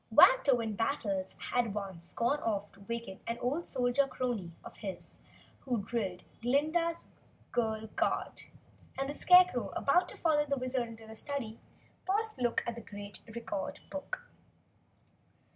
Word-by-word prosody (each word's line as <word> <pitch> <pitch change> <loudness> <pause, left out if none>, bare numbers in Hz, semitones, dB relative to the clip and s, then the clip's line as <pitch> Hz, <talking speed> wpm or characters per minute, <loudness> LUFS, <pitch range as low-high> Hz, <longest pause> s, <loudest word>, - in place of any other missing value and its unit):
Wantowin 250 - +6
Battles 200 -6 -1 0.2
had 245 -1 +3
at 205 - -4
once 190 -4 -6
gone 275 +6 +2
off 205 -6 -1
to 200 - -20
waken 235 -5 -4
an 230 - -1
old 275 +8 -1
Soldier 255 +1 +2
Crony 240 -9 -2
of - - -10
his 195 -3 -7 0.4
who 240 -6 -1
drilled 195 -5 -2 0.2
Glinda's 315 +7 +1 0.5
Girl 220 -2 0
Guard, - - 0 0.5
and 270 0 0
the 285 - -3
Scarecrow, 360 -6 +6
about 355 +6 +3
to - - -10
follow 300 -3 +3
the 280 0 +1
Wizard 255 -1 -1
into 225 -1 -10
the 220 0 -10
study, 230 -2 -4 0.5
paused 435 +3 +1
to - - -9
look 240 -1 +2
at 235 - -1
the 235 - -7
great 205 -1 -8
record 220 -4 -4
book. - - -4
240 Hz, 150 wpm, -33 LUFS, 215-280 Hz, 0.5 s, Wantowin